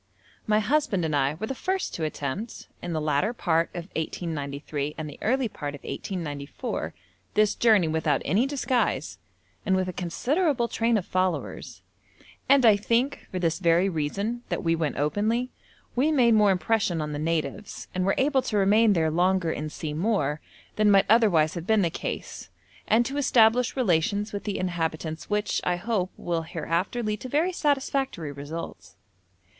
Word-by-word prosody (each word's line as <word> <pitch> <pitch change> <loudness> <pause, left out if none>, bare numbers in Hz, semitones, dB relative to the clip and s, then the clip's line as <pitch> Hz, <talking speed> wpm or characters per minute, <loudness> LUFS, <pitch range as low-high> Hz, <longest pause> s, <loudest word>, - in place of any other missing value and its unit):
My 210 0 +3
husband 215 - +1
and 155 -2 0
I 140 +1 +1
were 185 - -4
the 270 - -3
first 375 +8 -2
to 165 - -4
attempt 155 - -4
(in 175 - -5
the 160 - -1
latter 155 +8 +1
part 165 -7 +1
of 175 -2 -5
1893 150 -3 -3
and 155 - -4
the 145 - -10
early 255 +2 +1
part 145 -8 -6
of 145 - -14
1894) 145 -7 -5 0.4
this 215 -1 +4
journey 215 -7 +4
without 160 0 0
any 210 - +2
disguise, 265 -3 -1 0.4
and 190 -2 +2
with 185 -1 0
a 185 - -4
considerable 250 - 0
train 230 0 +1
of 190 - -3
followers, 185 0 -2 0.7
and 275 -2 +6
I 215 -3 +7
think, 235 +6 0
for 185 - -4
this 165 -2 0
very 175 +1 +3
reason, 200 +9 -2
that - - -2
we 165 -1 +2
went 160 -3 -2
openly, 215 - 0 0.4
we 280 +6 +2
made 245 -6 +4
more 210 -2 +5
impression 190 -2 +1
on 150 -1 -3
the 145 - -3
natives, 165 +6 -3
and 185 - 0
were 195 - +2
able 270 0 +3
to 215 - -2
remain 210 +2 +4
there 160 -3 +1
longer 180 0 +2
and 155 0 -4
see 150 -1 -5
more, 155 -4 0 0.4
than 215 0 +4
might 195 -1 +5
otherwise 200 -9 +4
have 170 +1 -6
been 220 -2 +4
the 170 - +1
case, - - -5 0.4
and 235 +2 +4
to 275 +3 -3
establish 245 -3 +4
relations 205 - +1
with 200 - -5
the 205 -2 -2
inhabitants 165 -3 -3
which, 210 0 0
I 180 - +1
hope, 190 0 -1
will 170 -1 -2
hereafter 170 +8 -2
lead 210 -1 -2
to 255 - -6
very 315 +7 +1
satisfactory 270 - -1
results. 145 +4 -8
190 Hz, 170 wpm, -26 LUFS, 160-230 Hz, 0.7 s, I